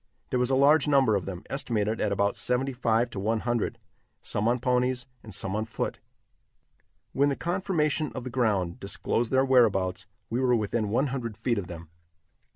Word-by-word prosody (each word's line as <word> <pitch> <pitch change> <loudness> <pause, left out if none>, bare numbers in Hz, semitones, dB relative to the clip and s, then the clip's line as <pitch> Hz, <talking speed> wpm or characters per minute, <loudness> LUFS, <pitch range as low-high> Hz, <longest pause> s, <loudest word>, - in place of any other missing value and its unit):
There 125 - +1
was 125 0 +2
a 135 - +3
large 145 +3 +5
number 135 -7 +4
of 95 - -2
them, 90 -2 -6
estimated 110 -5 -1
at 105 - +1
about 100 0 +1
seventy 130 +2 0
five 120 -1 +1
to 100 - -5
one 110 +2 0
hundred, 120 -2 -1 0.5
some 105 +2 -1
on 120 +1 +3
ponies 125 0 0 0.2
and 110 - -11
some 95 +1 -1
on 110 +1 -1
foot. - - -4 1.1
When 140 +1 +3
the 140 - 0
conformation 165 -4 -1
of - - -4
the 130 - -6
ground 105 -9 0
disclosed 115 +4 -1
their 130 0 +3
whereabouts, 100 -7 +2 0.2
we 120 - -2
were 125 -2 +3
within 110 -1 -1
one 130 +6 +1
hundred 115 -5 -4
feet 115 -4 0
of 90 - -6
them. 85 -2 -9
120 Hz, 185 wpm, -27 LUFS, 105-130 Hz, 1.1 s, large